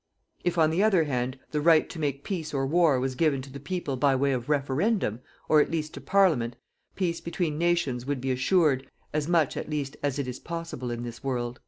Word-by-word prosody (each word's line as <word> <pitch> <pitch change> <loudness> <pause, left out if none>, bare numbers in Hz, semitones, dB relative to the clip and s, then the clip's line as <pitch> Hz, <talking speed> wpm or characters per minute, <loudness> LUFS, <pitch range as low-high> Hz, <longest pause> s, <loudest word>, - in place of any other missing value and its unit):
If, 175 0 0
on 160 -1 +4
the 170 +4 +1
other 200 -6 +4
hand, 130 -2 -2
the 150 - 0
right 160 0 +5
to 170 - -8
make 140 -2 -2
peace 160 -6 -4
or 135 0 +1
war 155 -2 +3
was 130 +1 -1
given 145 0 +2
to 135 -1 -11
the 140 - -7
people 145 -2 -3
by 135 +1 +3
way 140 +1 +2
of 125 0 -2
=referendum=, 145 - +1 0.3
or 155 -1 +6
at - - 0
least 155 -2 -3
to - - -8
Parliament, 155 -12 +2 0.4
peace 170 -3 -1
between 170 -3 -2
nations 165 -8 0
would 145 -2 -1
be 130 +1 -1
assured, 135 0 +2 0.2
as 150 0 0
much 165 -5 +2
at - - -5
least 145 -3 -3
as 145 -1 -1
it 140 -2 -2
is 125 0 -5
possible 165 -7 -5
in 120 0 -4
this 120 -1 -8
world." 120 -2 -2
145 Hz, 220 wpm, -27 LUFS, 130-165 Hz, 0.4 s, or